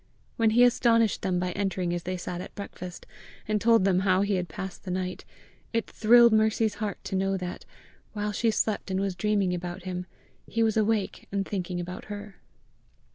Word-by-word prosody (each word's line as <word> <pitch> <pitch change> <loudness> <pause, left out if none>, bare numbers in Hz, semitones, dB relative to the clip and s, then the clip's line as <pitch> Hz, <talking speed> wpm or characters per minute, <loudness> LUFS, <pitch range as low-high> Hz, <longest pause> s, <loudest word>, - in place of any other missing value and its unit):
When 225 -1 +3
he 235 +3 +5
astonished 230 -3 +3
them 185 -2 0
by 180 0 -1
entering 185 -2 -1
as 175 - -2
they 185 +2 -3
sat 175 0 -5
at - - -10
breakfast, 180 -3 -8 0.4
and 210 -1 0
told 230 -4 +5
them 185 -2 +3
how 190 0 +3
he 200 0 0
had 180 -2 -1
passed 190 +4 -7
the 190 - -7
night, 185 0 -3 0.5
it 230 -1 +1
thrilled 235 +1 +6
Mercy's 220 0 +3
heart 205 -3 -2
to - - -4
know 195 0 +1
that, 180 -1 -6 0.5
while 210 -1 -2
she 225 +2 +1
slept 215 -2 0
and 190 0 0
was 195 -1 -1
dreaming 200 -2 +1
about 175 +1 -5
him, 180 -1 -4 0.4
he 230 - +1
was 220 -1 +2
awake 215 -2 0
and 200 -1 -1
thinking 180 -3 -3
about 180 +1 -6
her. 205 -1 -8
195 Hz, 190 wpm, -27 LUFS, 180-215 Hz, 0.5 s, thrilled